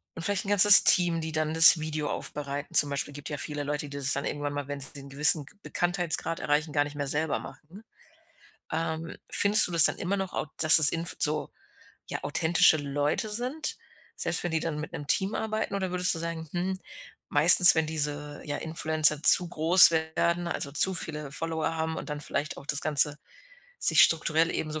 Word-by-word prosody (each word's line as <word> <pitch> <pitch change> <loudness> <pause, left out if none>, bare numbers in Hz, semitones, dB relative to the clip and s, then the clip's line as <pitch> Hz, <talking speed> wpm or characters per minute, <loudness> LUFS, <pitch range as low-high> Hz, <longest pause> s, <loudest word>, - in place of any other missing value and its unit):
und 165 - -10
vielleicht 200 +1 -2
'n 195 - -8
ganzes 205 0 +8
Team, 175 -2 +4
die 160 0 -6
dann 155 0 -4
das 165 +1 +7
Video 155 -1 -6
aufbereiten. 145 0 -8
Zum 145 - +3
Beispiel, 140 +1 -4
gibt 145 0 -10
ja 145 - -7
viele 150 -1 -6
Leute, 145 0 -6
die 140 - -10
das 135 -1 +2
dann 140 - -4
irgendwann 145 0 -6
mal, 145 -1 -8
wenn 145 0 -8
sie 135 - -6
den 140 -1 -13
gewissen 150 +2 +2 0.2
Bekanntheitsgrad 175 -2 -2
erreichen, 150 +1 -4
gar 145 0 0
nicht 145 0 -12
mehr 145 -1 -6
selber 150 +2 -3
machen. 180 +8 -16 0.9
Ähm, 160 0 -6 0.2
findest 205 +2 +4
du - - -10
das 165 -2 +7
dann - - +1
immer 195 +3 -5
noch 190 -1 -7
au - - -6
dass 155 -1 +8
es 150 - +7
in 165 0 -5
so, 150 +1 -3 0.6
ja, - - -8
authentische 160 +2 0
Leute 145 +7 -4
sind, 250 +8 -5 0.4
selbst - - -1
wenn 175 - -5
die 160 - -2
dann 155 -2 -6
mit 150 - -10
'nem 145 -3 -9
Team 195 +6 -1
arbeiten 220 -2 -6
oder 190 -2 -5
würdest 180 -1 +2
du - - -7
sagen: 165 -1 -8
„Hm, 185 +2 -5 0.5
meistens, 175 +5 +7
wenn 160 -1 -2
diese, 150 -1 -4
ja, 145 -1 -6
Influencer 155 -1 0
zu 180 - +6
groß 170 +2 +5
werden, 170 +2 -3
also, 140 - -5
zu 190 +5 +1
viele 150 -4 -4
Follower 160 +1 -5
haben 160 0 -5
und - - -10
dann 150 - -7
vielleicht 150 +1 -6
auch - - -14
das 145 -1 +2
Ganze 150 -1 +2 0.6
sich - - +4
strukturell 165 0 -1
eben 155 - -6
so 155 - -6
160 Hz, 205 wpm, -24 LUFS, 145-170 Hz, 0.9 s, ganzes